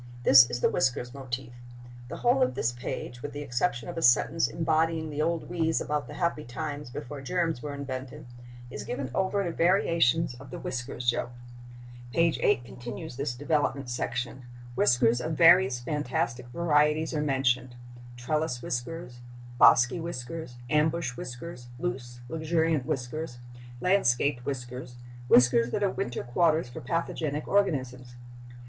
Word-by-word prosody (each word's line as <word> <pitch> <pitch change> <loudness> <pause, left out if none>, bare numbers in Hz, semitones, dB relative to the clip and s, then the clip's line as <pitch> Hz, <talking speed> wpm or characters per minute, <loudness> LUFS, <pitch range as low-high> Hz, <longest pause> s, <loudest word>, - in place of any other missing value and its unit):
This 130 -1 +8
is 120 - -3
the - - +4
whiskers 125 -1 0
motif. 130 -2 -6 0.5
The - - -6
whole 245 +2 +2
of 255 - +2
this 115 - 0
page, 120 0 -6
with 145 - -6
the 145 0 -5
exception 125 -1 -1
of - - -4
a - - -5
sentence 120 -2 +4
embodying 160 +3 0
the 150 +1 -2
old 165 +1 -1
wheeze 165 -2 0
about 150 -1 -2
the - - -9
happy 170 -4 -1
times 145 +2 -5
before 135 +3 -7
germs 165 -2 -1
were 145 -1 -5
invented, 130 -2 -6 0.5
is - - -6
given 130 -1 -4
over 190 +3 +1
to 175 - -2
variations 165 -5 +2
of 135 0 -12
the - - -6
whiskers 125 -1 -5
joke. 120 0 +1 0.8
Page 165 -3 +2
8 120 - +2
continues 125 +5 -8
this 135 -2 -3
development 140 -2 -1
section. 125 +1 -3 0.3
Whiskers 120 -1 +3
of 160 - -2
various 170 -5 +6
fantastic 125 -3 -2
varieties 150 +2 +2
are 150 - 0
mentioned—trellis 125 0 -2
whiskers, 125 0 -5 0.4
bosky 125 +8 +6
whiskers, 160 -3 -6
ambush 150 -1 +1
whiskers, 125 +1 -8
loose, 120 0 -5
luxuriant 160 -1 0
whiskers, 135 -1 -3 0.4
landscaped 140 -8 +2
whiskers, 125 -2 -5 0.3
whiskers 120 -1 +5
that 205 - -1
are 195 - +2
winter 120 -1 -3
quarters 155 +4 +2
for 120 - -8
pathogenic 155 0 -2
organisms. 130 -11 0
135 Hz, 140 wpm, -28 LUFS, 120-160 Hz, 0.8 s, This